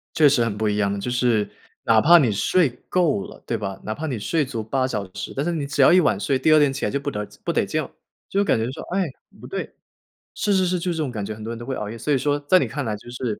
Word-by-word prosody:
确 155 Hz, -3 st, +6 dB
实 135 Hz, -4 st, +3 dB
很 110 Hz, -3 st, -2 dB
不 110 Hz, 0 st, 0 dB
一 105 Hz, -, 0 dB
样 100 Hz, -1 st, +1 dB
的， 100 Hz, -, -3 dB
就 110 Hz, +5 st, -3 dB
是 120 Hz, -4 st, +1 dB, 0.3 s
哪 110 Hz, -1 st, +4 dB
怕 170 Hz, +8 st, +7 dB
你 130 Hz, -8 st, +3 dB
睡 150 Hz, -, +2 dB, 0.2 s
够 180 Hz, +3 st, +2 dB
了 205 Hz, -, -12 dB
对 115 Hz, -, -1 dB
吧， 100 Hz, -2 st, -5 dB
哪 110 Hz, -, -3 dB
怕 160 Hz, -, -5 dB
你 130 Hz, -6 st, -3 dB
睡 150 Hz, +9 st, 0 dB
足 120 Hz, -4 st, -4 dB
8 130 Hz, +4 st, 0 dB
小 105 Hz, -6 st, -3 dB
时， -, -, -5 dB
但 140 Hz, -, 0 dB
是 175 Hz, -, 0 dB
你 155 Hz, -4 st, -2 dB
只 145 Hz, 0 st, +1 dB
要 135 Hz, -, +7 dB
一 180 Hz, -, +7 dB
晚 145 Hz, -, +2 dB
睡， 135 Hz, +6 st, 0 dB
第 155 Hz, +4 st, +3 dB
二 155 Hz, -, +7 dB
天 145 Hz, -2 st, +3 dB
起 140 Hz, -, -4 dB
来 -, -, 0 dB
就 140 Hz, -, -1 dB
不 145 Hz, +1 st, -3 dB
得 105 Hz, -4 st, -4 dB, 0.2 s
不 -, -, 0 dB
得 -, -, +1 dB
劲。 -, -, -2 dB, 0.4 s
就 195 Hz, -, 0 dB
会 -, -, +3 dB
感 200 Hz, -, +2 dB
觉 110 Hz, -, 0 dB
说， -, -, -8 dB
“哎， 195 Hz, -, +2 dB, 0.4 s
不 -, -, -10 dB
对！” -, -, -5 dB, 0.6 s
是 205 Hz, -, 0 dB
是 190 Hz, -1 st, +3 dB
是， 180 Hz, 0 st, 0 dB
就 180 Hz, +1 st, -2 dB
是 170 Hz, -, -3 dB
这 160 Hz, -, 0 dB
种 135 Hz, -, -3 dB
感 105 Hz, -4 st, -4 dB
觉， 110 Hz, -, -4 dB
很 110 Hz, -, -10 dB
多 115 Hz, -, -5 dB
人 115 Hz, -, -5 dB
都 120 Hz, -, -8 dB
会 130 Hz, +1 st, -3 dB
熬 105 Hz, -3 st, -4 dB
夜。 115 Hz, -, -7 dB
所 145 Hz, +6 st, -1 dB
以 -, -, +3 dB
说 145 Hz, +2 st, 0 dB
在 145 Hz, +6 st, +4 dB
你 -, -, 0 dB
看 145 Hz, -3 st, -4 dB
来 110 Hz, -2 st, -2 dB
就 105 Hz, +3 st, -12 dB
是， 120 Hz, -3 st, -3 dB
130 Hz, 340 characters per minute, -23 LUFS, 110-155 Hz, 0.6 s, 怕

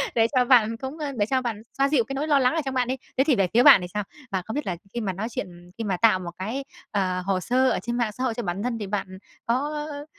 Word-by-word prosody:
Để 225 Hz, -1 st, +4 dB
cho 250 Hz, -1 st, +4 dB
bạn 230 Hz, -3 st, +4 dB
cũng 265 Hz, +5 st, -6 dB
ơ, 300 Hz, -3 st, -3 dB
để 205 Hz, -, +2 dB
cho 260 Hz, +3 st, 0 dB
bạn 230 Hz, -4 st, -3 dB, 0.2 s
xoa 275 Hz, +1 st, +3 dB
dịu 280 Hz, -5 st, +3 dB
cái 270 Hz, -, -6 dB
nỗi 285 Hz, +3 st, -2 dB
lo 290 Hz, -2 st, +4 dB
lắng 255 Hz, +4 st, +2 dB
ở 325 Hz, -, +1 dB
trong 270 Hz, -, -2 dB
bạn 250 Hz, -2 st, +1 dB
đi. 260 Hz, -, -1 dB, 0.2 s
Thế 265 Hz, -, +5 dB
thì 285 Hz, -2 st, +3 dB
về 195 Hz, -4 st, +2 dB
phía 240 Hz, +2 st, +5 dB
bạn 270 Hz, -9 st, +9 dB
thì 180 Hz, -, -5 dB
sao? 210 Hz, 0 st, -1 dB, 0.3 s
Mà 190 Hz, -1 st, 0 dB
không 220 Hz, -, -5 dB
biết 295 Hz, -, -2 dB
là 180 Hz, -, -1 dB, 0.2 s
khi 240 Hz, -, -2 dB
mà 195 Hz, -4 st, -2 dB
nói 200 Hz, +5 st, -3 dB
chuyện, 210 Hz, -, -4 dB
ừm, 175 Hz, 0 st, -15 dB
khi 230 Hz, -, -3 dB
mà 195 Hz, -4 st, -1 dB
tạo 215 Hz, -1 st, +4 dB
một 175 Hz, -2 st, -6 dB
cái, 225 Hz, +9 st, -3 dB, 0.3 s
ờ, 185 Hz, -3 st, 0 dB
hồ 195 Hz, -1 st, +1 dB
sơ 255 Hz, +6 st, +2 dB
ở -, -, 0 dB
trên 240 Hz, 0 st, -2 dB
mạng 235 Hz, -3 st, 0 dB
xã 250 Hz, +5 st, -5 dB
hội 255 Hz, -3 st, +1 dB
cho 240 Hz, -, -4 dB
bản 190 Hz, +1 st, -3 dB
thân 245 Hz, -1 st, -1 dB
thì 205 Hz, -, -4 dB
bạn 190 Hz, -2 st, -4 dB, 0.3 s
có, 230 Hz, -, +1 dB, 0.2 s
ơ, 300 Hz, 0 st, -4 dB
ơ, 290 Hz, 0 st, -7 dB
230 Hz, 325 wpm, -25 LUFS, 200-265 Hz, 0.3 s, bạn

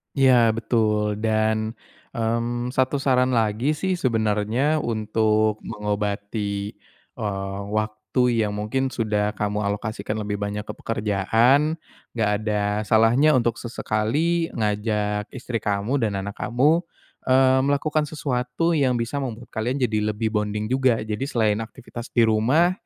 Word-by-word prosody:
Iya 135 Hz, -2 st, +5 dB, 0.2 s
betul. 105 Hz, -3 st, 0 dB
Dan, 110 Hz, 0 st, 0 dB, 0.4 s
mmm, 120 Hz, +1 st, -1 dB
1 130 Hz, +1 st, +1 dB
saran 130 Hz, -1 st, +3 dB
lagi 115 Hz, +6 st, +1 dB
sih 185 Hz, +3 st, -1 dB
sebenernya 115 Hz, +5 st, +1 dB
untuk 110 Hz, -2 st, +1 dB
mengobati, 105 Hz, -1 st, -3 dB, 0.5 s
eee, 95 Hz, -1 st, -3 dB, 0.2 s
waktu 110 Hz, +1 st, -2 dB, 0.3 s
yang 105 Hz, -, -4 dB
mungkin 110 Hz, +6 st, -1 dB
sudah 105 Hz, -4 st, -1 dB
kamu 105 Hz, 0 st, -1 dB
alokasikan 105 Hz, +1 st, -3 dB
lebih 105 Hz, -1 st, -3 dB
banyak 105 Hz, 0 st, -3 dB
ke -, -, -6 dB
pekerjaan, 115 Hz, +8 st, +2 dB, 0.4 s
enggak 110 Hz, -3 st, +1 dB
ada 105 Hz, -1 st, -1 dB, 0.2 s
salahnya 120 Hz, +7 st, +4 dB
untuk 120 Hz, -2 st, +1 dB
sesekali 140 Hz, +9 st, 0 dB
ngajak 105 Hz, -1 st, -1 dB
istri 125 Hz, -2 st, -3 dB
kamu 105 Hz, +7 st, -1 dB
dan 105 Hz, -4 st, 0 dB
anak 100 Hz, +1 st, -5 dB
kamu, 135 Hz, +7 st, +3 dB, 0.5 s
eee, 130 Hz, 0 st, +5 dB
melakukan 150 Hz, +2 st, +1 dB
sesuatu 140 Hz, +1 st, -1 dB
yang 135 Hz, -6 st, +2 dB
bisa 120 Hz, +4 st, -2 dB
membuat 120 Hz, -3 st, -6 dB
kalian 125 Hz, +5 st, -1 dB
jadi 110 Hz, -3 st, +1 dB, 0.2 s
lebih 110 Hz, 0 st, -1 dB
bonding 105 Hz, +1 st, -2 dB
juga. 130 Hz, -2 st, +3 dB
Jadi 110 Hz, +5 st, -3 dB
selain 110 Hz, -5 st, +1 dB
aktivitas 120 Hz, +1 st, -8 dB
di 120 Hz, -, +5 dB
rumah, 125 Hz, +11 st, +3 dB
110 Hz, 130 wpm, -23 LUFS, 105-130 Hz, 0.5 s, Iya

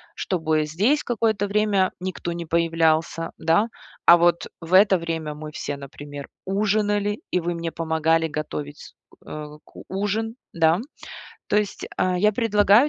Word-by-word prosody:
чтобы 160 Hz, -4 st, 0 dB
здесь 210 Hz, -, +1 dB
какое-то 220 Hz, -3 st, 0 dB
время 200 Hz, -2 st, +2 dB
никто 180 Hz, -2 st, -4 dB
не 170 Hz, -1 st, -5 dB
появлялся, 165 Hz, 0 st, +1 dB
да? 170 Hz, +8 st, +2 dB, 0.4 s
А 170 Hz, -, +10 dB
вот 170 Hz, 0 st, +2 dB
в 165 Hz, +2 st, -6 dB
это 195 Hz, 0 st, +7 dB
время 165 Hz, -3 st, -4 dB
мы 150 Hz, 0 st, -8 dB
все, 145 Hz, -1 st, -4 dB
например, 145 Hz, +1 st, -9 dB, 0.2 s
ужинали, 205 Hz, +1 st, 0 dB
и 180 Hz, -, +1 dB
вы 175 Hz, 0 st, -2 dB
мне 170 Hz, -1 st, -4 dB
помогали 160 Hz, 0 st, +1 dB
готовить, 150 Hz, -1 st, -6 dB, 0.3 s
э, 150 Hz, 0 st, -6 dB, 0.2 s
к -, -, -24 dB, 0.2 s
ужин, 210 Hz, +4 st, -2 dB, 0.2 s
да? 165 Hz, +1 st, +3 dB, 0.7 s
То 210 Hz, -, +2 dB
есть, 210 Hz, -1 st, -1 dB
а, 185 Hz, 0 st, +1 dB
я 210 Hz, +3 st, +4 dB
предлагаю 210 Hz, +3 st, +4 dB
170 Hz, 145 wpm, -24 LUFS, 160-205 Hz, 0.7 s, А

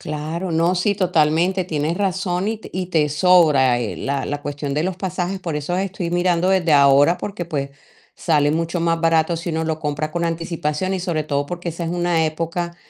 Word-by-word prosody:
Claro, 155 Hz, +4 st, -4 dB
no, 165 Hz, +2 st, +2 dB
sí, 200 Hz, +3 st, +1 dB
totalmente, 180 Hz, 0 st, +2 dB
tienes 155 Hz, 0 st, -2 dB
razón 190 Hz, -1 st, -1 dB
y 225 Hz, -, -2 dB
te -, -, -11 dB
y 185 Hz, 0 st, -3 dB
te 160 Hz, -4 st, +1 dB
sobra, 150 Hz, -6 st, +4 dB
eh, 105 Hz, -8 st, -4 dB
la 140 Hz, -, -2 dB
la 145 Hz, 0 st, -4 dB
cuestión 145 Hz, -1 st, -4 dB
de 150 Hz, -, 0 dB
los 185 Hz, +1 st, -2 dB
pasajes, 185 Hz, 0 st, -3 dB
por 170 Hz, -4 st, -4 dB
eso 150 Hz, +4 st, -2 dB
estoy 190 Hz, -3 st, -3 dB
mirando 175 Hz, 0 st, +1 dB
desde 180 Hz, -4 st, +2 dB
ahora, 140 Hz, +3 st, +5 dB
porque 195 Hz, -3 st, -5 dB
pues 140 Hz, -4 st, -3 dB, 0.5 s
sale 150 Hz, -4 st, +2 dB
mucho 165 Hz, +2 st, -1 dB
más 165 Hz, 0 st, +1 dB
barato 165 Hz, 0 st, +2 dB
si 165 Hz, +1 st, -4 dB
uno 160 Hz, 0 st, -1 dB
lo 160 Hz, -1 st, -2 dB
compra 150 Hz, 0 st, -3 dB
con 170 Hz, +1 st, -2 dB
anticipación 165 Hz, +1 st, -2 dB
y 185 Hz, -, -2 dB
sobre 170 Hz, -4 st, -1 dB
todo 145 Hz, -1 st, -1 dB
porque 175 Hz, +2 st, -5 dB
esa 170 Hz, +1 st, -5 dB
es 165 Hz, -, -3 dB
una 175 Hz, -2 st, +1 dB
época 170 Hz, +2 st, -3 dB
165 Hz, 205 wpm, -21 LUFS, 150-180 Hz, 0.5 s, ahora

